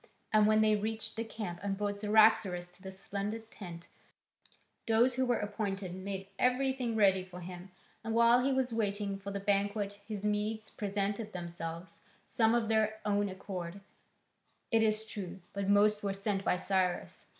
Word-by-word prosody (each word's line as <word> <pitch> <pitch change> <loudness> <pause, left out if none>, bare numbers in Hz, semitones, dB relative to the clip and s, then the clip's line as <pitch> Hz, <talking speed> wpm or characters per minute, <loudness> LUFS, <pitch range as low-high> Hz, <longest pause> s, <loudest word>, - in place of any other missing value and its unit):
And 215 -1 +6
when 215 0 +5
they 215 0 +4
reached 220 +1 -3
the 225 - -2
camp 210 -6 -5
and 195 0 -2
brought 205 0 -2
Cyaxares 210 -4 +4
to 180 +1 -19
the 190 0 -7
splendid 205 +3 -5
tent, 170 -4 -9 1.0
those 230 +3 +4
who 260 +1 0
were 245 -2 +2
appointed 200 -3 -3
made 195 +1 -5
everything 255 -2 +1
ready 190 -3 +4
for 180 -1 -10
him, 180 +1 -8 0.3
and 225 0 -2
while 235 +1 +6
he 275 - +2
was 260 -2 0
waiting 205 -2 -1
for 200 0 -6
the 200 0 -3
banquet 200 0 0
his 210 -2 -4
Medes 210 +1 -1
presented 205 +1 -2
themselves, 170 -1 -6 0.2
some 225 0 +3
of 235 -2 +1
their 220 0 +1
own 205 -1 +1
accord, 185 -1 -6 0.9
it 225 -1 +4
is 215 0 +2
true, 195 -3 -6
but 200 0 -2
most 205 +1 +4
were 200 -1 -1
sent 195 0 -1
by 180 - +2
Cyrus. 185 -1 -1
205 Hz, 165 wpm, -32 LUFS, 195-220 Hz, 1.0 s, And